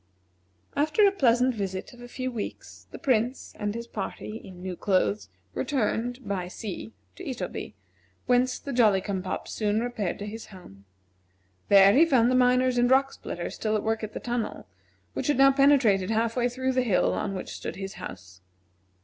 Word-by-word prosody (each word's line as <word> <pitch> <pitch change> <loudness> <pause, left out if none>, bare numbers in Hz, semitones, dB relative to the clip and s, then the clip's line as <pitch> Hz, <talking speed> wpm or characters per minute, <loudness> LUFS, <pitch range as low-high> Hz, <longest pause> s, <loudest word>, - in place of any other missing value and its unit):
After 305 +8 +3
a 400 - +5
pleasant 250 -7 +3
visit 195 -2 -4
of 245 - -14
a 245 - -9
few 255 +1 -4
weeks, 230 -4 -7
the - - -9
Prince 245 0 0
and 210 0 -2
his 235 0 -5
party 215 0 -5
(in 180 -1 -11
new 185 -1 -4
clothes) 105 - 0 0.2
returned 245 - -1
(by 190 -3 -2
sea) 185 - -6 0.2
to - - -10
Itoby, - - -5 0.5
whence 250 +1 +2
the 280 - -6
Jolly 215 -5 +4
cum 190 -1 -3
pop 185 0 -4
soon 210 0 0
repaired 225 -6 -2
to 205 - -6
his 220 +2 -7
home. 100 - -14 0.8
There 200 0 +8
he 290 - +7
found 255 -7 +4
the - - +3
miners 250 0 +3
and 245 0 +3
rock 270 +1 +4
splitters 175 - -6
still 215 -1 -1
at 210 - -1
work 220 0 -1
at 215 - -5
the - - -4
tunnel, 240 -2 -3 0.5
which - - -3
had 290 - +2
now 275 0 +7
penetrated 260 -9 +4
half 225 +1 +1
way 245 -1 +1
through 260 +2 -1
the 255 0 +2
hill 225 -7 +2
on 195 -2 -2
which 185 - -5
stood - - -6
his 195 0 -6
house. 90 0 -9
225 Hz, 185 wpm, -27 LUFS, 195-255 Hz, 0.8 s, There